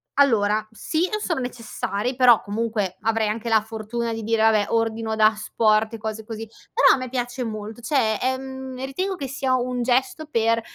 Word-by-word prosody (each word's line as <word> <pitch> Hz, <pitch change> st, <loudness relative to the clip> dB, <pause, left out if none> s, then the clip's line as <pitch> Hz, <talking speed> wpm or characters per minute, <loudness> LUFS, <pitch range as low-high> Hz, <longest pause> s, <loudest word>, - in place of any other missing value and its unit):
allora 215 Hz, -6 st, +3 dB
sì 315 Hz, +10 st, -1 dB
on 425 Hz, -, -1 dB
sono 335 Hz, -8 st, -1 dB
necessari 245 Hz, -1 st, -3 dB
però, 245 Hz, -3 st, +6 dB
comunque 205 Hz, -2 st, -2 dB
avrei 225 Hz, 0 st, +1 dB
anche 225 Hz, +2 st, -4 dB
la 220 Hz, -1 st, +4 dB
fortuna 225 Hz, +2 st, -4 dB
di 225 Hz, 0 st, -4 dB
dire: 225 Hz, +1 st, +1 dB
"Vabbè, 220 Hz, -2 st, +4 dB
ordino 225 Hz, -1 st, 0 dB
da 215 Hz, 0 st, +6 dB
asporto", 215 Hz, +1 st, +1 dB
e -, -, -6 dB
cose 220 Hz, 0 st, -5 dB
così, 225 Hz, 0 st, -6 dB, 0.3 s
però -, -, +6 dB
a -, -, -5 dB
me 255 Hz, -1 st, -4 dB
piace 245 Hz, 0 st, -3 dB
molto 215 Hz, 0 st, -6 dB
cioè, 235 Hz, -4 st, +1 dB
ehm, 260 Hz, 0 st, -3 dB
ritengo 370 Hz, +9 st, -2 dB
che 280 Hz, -6 st, -5 dB
sia 265 Hz, 0 st, -1 dB
un 250 Hz, 0 st, -1 dB
gesto 260 Hz, +5 st, +1 dB
per 230 Hz, -5 st, +1 dB
230 Hz, 185 wpm, -23 LUFS, 220-255 Hz, 0.3 s, però